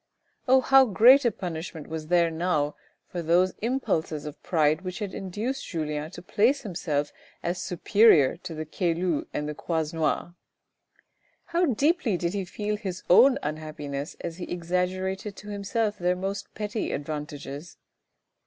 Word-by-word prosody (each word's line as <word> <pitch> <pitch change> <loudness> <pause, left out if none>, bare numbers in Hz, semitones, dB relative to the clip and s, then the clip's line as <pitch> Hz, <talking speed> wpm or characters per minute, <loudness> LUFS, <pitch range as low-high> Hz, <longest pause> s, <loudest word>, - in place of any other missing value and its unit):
Oh, 260 +1 +6
how 270 +1 +6
great 250 +5 +6
a 235 - +4
punishment 165 -4 -6
was 160 -1 -6
there 170 -1 +3
now 160 -3 0 0.3
for 175 - -4
those 175 +3 +3
impulses 165 - -1
of 150 -1 -8
pride 155 -2 +2
which 185 -1 -5
had 200 -2 -4
induced 215 +8 -4
Julien 155 -2 -3
to 175 0 -10
place 235 +9 +2
himself 155 - -2 0.3
as 175 +1 -2
superior 180 -5 +4
to 175 -2 -8
the 155 0 -4
Caylus 170 0 -1
and 150 - -3
the 150 - -3
Croisenois! 160 +1 -1 1.1
How 340 +1 +1
deeply 275 - +2
did 170 +1 -2
he 195 -2 -2
feel 210 +3 -3
his 190 -4 -5
own 260 +8 +7
unhappiness 150 -2 -5
as 170 -1 -5
he 180 - -5
exaggerated 185 +3 -2
to 210 - -10
himself 210 +1 -1
their 180 +1 +2
most 195 +2 -4
petty 210 +1 -3
advantages. 145 +1 -6
180 Hz, 145 wpm, -27 LUFS, 155-210 Hz, 1.1 s, own